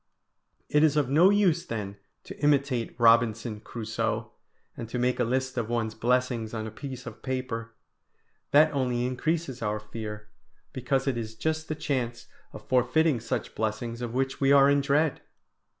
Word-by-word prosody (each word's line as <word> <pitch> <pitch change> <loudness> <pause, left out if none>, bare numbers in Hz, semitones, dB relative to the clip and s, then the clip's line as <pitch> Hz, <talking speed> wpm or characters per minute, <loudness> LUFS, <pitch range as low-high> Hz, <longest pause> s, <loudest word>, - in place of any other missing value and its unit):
It 150 +1 +3
is 155 -1 +3
of 145 -4 +2
no 165 +6 +6
use 190 -5 +3
then 105 - -5 0.3
to - - -9
imitate 140 -5 +1
Robinson 115 -1 +3
Crusoe, 115 0 -3 0.4
and 115 - -7
to 125 - -3
make 125 +1 0
a - - +3
list 130 +1 -1
of 115 -1 -3
one's 115 -2 -1
blessings 120 -1 0
on 110 0 -3
a 110 - -6
piece 130 +2 -8
of 110 0 -9
paper; 120 -3 -4 0.7
that 155 +2 +5
only 125 -3 0
increases 135 +1 -2
our 105 -1 -1
fear, 105 0 -7 0.5
because 130 +1 -1
it 135 -4 0
is 110 -1 -6
just 160 +5 -2
the 155 - -3
chance 125 -6 -3 0.3
of - - -12
forfeiting 130 +3 +2
such 115 0 -4
blessings 115 +2 -3
of 120 0 -4
which 135 +1 -1
we 135 0 +4
are 140 0 +7
in 140 0 +3
dread! 145 +2 +1
125 Hz, 165 wpm, -27 LUFS, 115-140 Hz, 0.7 s, are